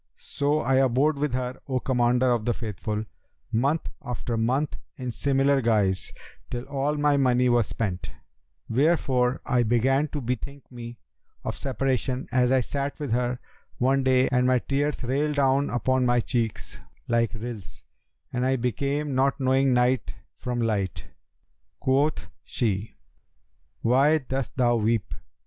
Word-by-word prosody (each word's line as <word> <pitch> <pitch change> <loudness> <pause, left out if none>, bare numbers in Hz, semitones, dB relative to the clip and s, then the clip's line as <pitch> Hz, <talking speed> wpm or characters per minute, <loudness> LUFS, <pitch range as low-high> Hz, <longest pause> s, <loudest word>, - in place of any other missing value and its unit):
So, 145 +2 -1
I 130 -2 +2
abode 135 +3 +2
with 145 -3 0
her, 130 0 -3
O 130 -2 0
Commander 125 0 +2
of 120 -3 +1
the 120 - +1
Faithful, 105 0 -4 0.5
month 140 +8 +1 0.2
after 120 -2 -3
month 130 +6 0 0.2
in 125 -2 -4
similar 135 +2 +2
guise, 105 -6 +1 0.4
till 120 0 -4
all 140 +2 -1
my 145 -1 +2
money 125 -2 +3
was 120 -3 +3
spent; 95 -5 -3 0.6
wherefore 130 -2 +2
I 125 -1 +2
began 130 +5 +2
to 150 - -4
bethink 130 +3 -4
me 120 -1 -8 0.5
of - - -3
separation 130 -1 -1
as 125 0 +3
I 130 -1 +4
sat 140 +3 -3
with 145 -5 -4
her 125 +1 0 0.4
one 135 +2 +2
day 130 0 +4
and 125 -1 +2
my 130 0 +4
tears 140 +3 -1
railed 145 +4 0
down 140 0 +2
upon 130 +2 +1
my 120 0 +3
cheeks 115 -2 -2 0.3
like 115 -1 +1
rills, 110 -4 -8 0.5
and 125 0 0
I 130 +1 +2
became 140 +4 -1
not 135 +2 +2
knowing 135 0 +3
night 125 +1 +1 0.2
from 125 -1 -2
light. 105 -5 -1 0.7
Quoth 140 +4 +1 0.2
she, 105 -2 -2 0.9
'Why 135 +6 +4
dost 135 -3 -4
thou 120 -2 +3
weep?' 110 -3 0
125 Hz, 145 wpm, -26 LUFS, 120-135 Hz, 0.9 s, I